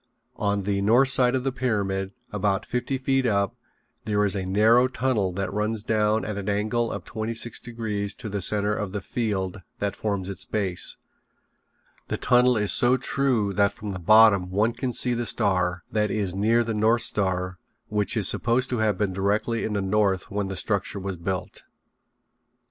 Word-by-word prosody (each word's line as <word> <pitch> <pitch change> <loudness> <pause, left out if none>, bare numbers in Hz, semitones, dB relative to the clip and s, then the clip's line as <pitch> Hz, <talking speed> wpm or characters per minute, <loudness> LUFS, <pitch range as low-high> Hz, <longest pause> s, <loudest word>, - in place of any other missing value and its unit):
On 100 -1 0
the 100 0 -1
north 120 +6 +4
side 130 -1 +4
of 130 - -1
the 135 - 0
pyramid, 100 -6 -1 0.2
about 100 -1 -1
fifty 125 +2 -2
feet 135 0 +1
up, 100 +2 0 0.5
there 105 -1 +1
is 100 - +3
a 95 -2 -3
narrow 110 +6 +4
tunnel 125 -6 0
that 100 +1 -3
runs 105 +1 -1
down 110 0 +1
at 105 -1 -4
an 100 +1 -4
angle 110 +3 0
of - - -6
twenty 110 +1 -4
six 115 +1 -2
degrees 110 -4 -4
to 125 - -6
the 100 -1 -3
center 105 +2 +2
of 105 -3 -4
the 105 - -3
field 100 -3 -3 0.2
that 100 -1 -2
forms 100 -3 -2
its 100 - -5
base. 95 -4 -1 1.1
The - - -2
tunnel 125 0 +3
is 105 -1 +2
so 125 +1 +5
true 125 -6 0
that 100 0 +2
from 105 -2 -7
the 90 - -5
bottom 100 0 +5
one 105 +5 +1
can 125 +1 -3
see 125 +1 +1
the 120 -1 -2
star, 90 -5 0
that 105 -1 +1
is 100 -4 -1
near 110 +5 +2
the 115 -1 -3
North 110 +2 +2
Star, 90 -2 -2 0.3
which 105 +2 +1
is 100 -4 +3
supposed 125 +2 +1
to 125 - -1
have 105 -3 +1
been 100 -2 -1
directly 105 +4 0
in 110 - -2
the 100 - 0
north 95 -1 0
when 100 0 -2
the 95 -1 -5
structure 100 -1 -2
was 95 0 -4
built. 90 +1 -4
105 Hz, 190 wpm, -25 LUFS, 100-115 Hz, 1.1 s, so